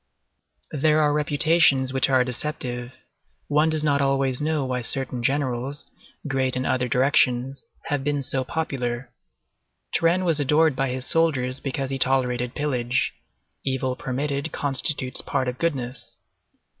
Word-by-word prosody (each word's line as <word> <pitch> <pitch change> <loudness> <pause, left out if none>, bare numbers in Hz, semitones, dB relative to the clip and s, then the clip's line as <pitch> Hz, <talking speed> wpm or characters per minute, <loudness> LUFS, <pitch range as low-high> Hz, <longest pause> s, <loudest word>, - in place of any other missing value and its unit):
There 155 +1 +2
are 150 -1 +3
reputations 145 -2 +3
which 135 0 +2
are 130 -1 +4
deceptive; 125 -1 -4 0.6
one 150 +2 +3
does 155 -1 0
not 140 -2 +2
always 135 -1 +1
know 150 -2 0
why 125 -1 -2
certain 130 0 -1
generals, 135 +1 -1 0.4
great 130 -2 0
in 130 +1 -2
other 125 -1 +1
directions, 130 0 +1 0.2
have 145 -2 -1
been 145 0 -1
so 130 0 -1
popular. 125 -4 -3 0.8
Turenne 175 +3 +2
was 165 -3 +2
adored 150 +1 +3
by 135 0 0
his 125 0 -3
soldiers 135 -6 +2
because 135 -1 -3
he 135 - -2
tolerated 125 -2 0
pillage; 125 -4 0 0.5
evil 130 -1 -1
permitted 140 +4 -3
constitutes 135 -1 0
part 135 -2 -1
of 125 0 -4
goodness. 130 -7 -2
135 Hz, 135 wpm, -24 LUFS, 125-145 Hz, 0.8 s, are